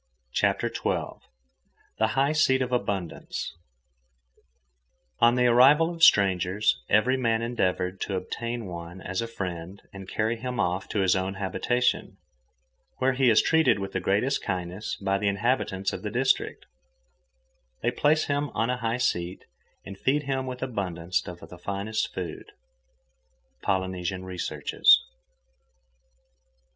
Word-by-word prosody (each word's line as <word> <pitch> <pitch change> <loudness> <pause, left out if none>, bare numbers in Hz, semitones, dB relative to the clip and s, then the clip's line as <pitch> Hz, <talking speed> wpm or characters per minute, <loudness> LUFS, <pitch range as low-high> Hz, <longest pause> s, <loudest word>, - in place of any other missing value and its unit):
CHAPTER - - +1
XII - - -2 0.8
THE 110 - +4
HIGH 140 +2 +3
SEAT 130 -4 +3
OF 125 - -5
ABUNDANCE 100 -12 -3 1.7
On 120 +1 +5
the 125 0 +3
arrival 140 +8 +5
of 165 - -10
strangers, 95 - +4
every 125 +5 +3
man 115 -3 +1
endeavoured 95 -5 -1
to 100 - -2
obtain 115 +5 -4
one 85 0 -8
as 95 +2 -3
a 115 - -3
friend 90 -4 -6
and 95 -1 -9
carry 110 +2 0
him 125 +1 -4
off 90 -1 -1
to 105 - 0
his 95 -1 +3
own 95 +1 -2
habitation, 120 +6 -1 0.8
where 130 +1 +2
he 130 -1 +3
is 110 - +5
treated 160 -8 +4
with 95 -1 -5
the - - -1
greatest 115 +8 +1
kindness 90 +2 -4
by 100 0 -1
the 105 - 0
inhabitants 100 -2 0
of - - -5
the 105 - -3
district; 130 +4 0 1.2
they 120 - +2
place 150 +5 +2
him 145 0 -1
on 115 +2 +1
a 125 - -1
high 115 -1 -1
seat 90 -7 -1 0.4
and 95 0 -9
feed 145 +3 +1
him 135 -2 -2
with 125 0 -5
abundance 90 -8 -2
of 90 -1 -9
the 90 - -12
finest 100 +4 -2
food.—Polynesian 85 +5 -6
Researches. 85 -5 +3
100 Hz, 135 wpm, -26 LUFS, 90-125 Hz, 1.7 s, On